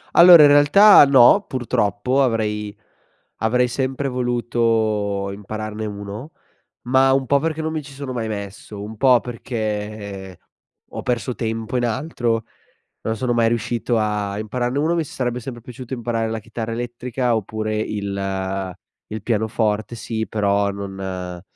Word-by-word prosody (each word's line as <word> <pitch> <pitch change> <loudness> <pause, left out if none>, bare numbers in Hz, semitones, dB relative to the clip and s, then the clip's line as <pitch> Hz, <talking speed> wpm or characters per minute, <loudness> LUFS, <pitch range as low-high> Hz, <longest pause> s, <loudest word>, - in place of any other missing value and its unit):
Allora 170 -2 +10
in 145 - +7
realtà, 145 +7 +7
no, 135 - +6
purtroppo 120 +1 0
avrei 105 -4 -1 0.7
avrei 125 +3 +2
sempre 130 +2 -2
voluto 115 -5 0
impararne 110 +2 -6
uno, 105 +7 -7 0.5
ma 130 +2 +3
un 135 0 +1
po' 140 +2 +3
perché 160 +1 -2
non 160 0 -2
mi 160 -1 -3
ci 140 0 -12
sono 135 -1 -6
mai 115 -2 -3
messo, 100 -1 -7
un 110 +1 -8
po' 130 0 +5
perché 105 -5 -5 0.5
ho - - -6
perso 125 +1 -1
tempo 115 +1 -3
in 120 - +1
altro, 120 -2 -1 0.6
non 110 - -2
sono 120 +2 -1
mai 115 -1 +3
riuscito 120 +1 -1
a 105 -2 -1
impararne 120 +4 -2
uno, 160 +3 +1
mi 165 - 0
s - - -12
sarebbe 125 -1 -2
sempre 120 -1 -8
piaciuto 125 +1 -9
imparare 115 -2 -2
la 110 0 -3
chitarra 115 +1 -6
elettrica 120 +1 -2
oppure 110 0 -3
il 95 -3 -3 0.3
il 110 0 -5
pianoforte. 110 0 -1
Sì, 110 -1 -4
però 100 -1 +1
non 95 -3 -6
115 Hz, 145 wpm, -21 LUFS, 105-125 Hz, 0.7 s, Allora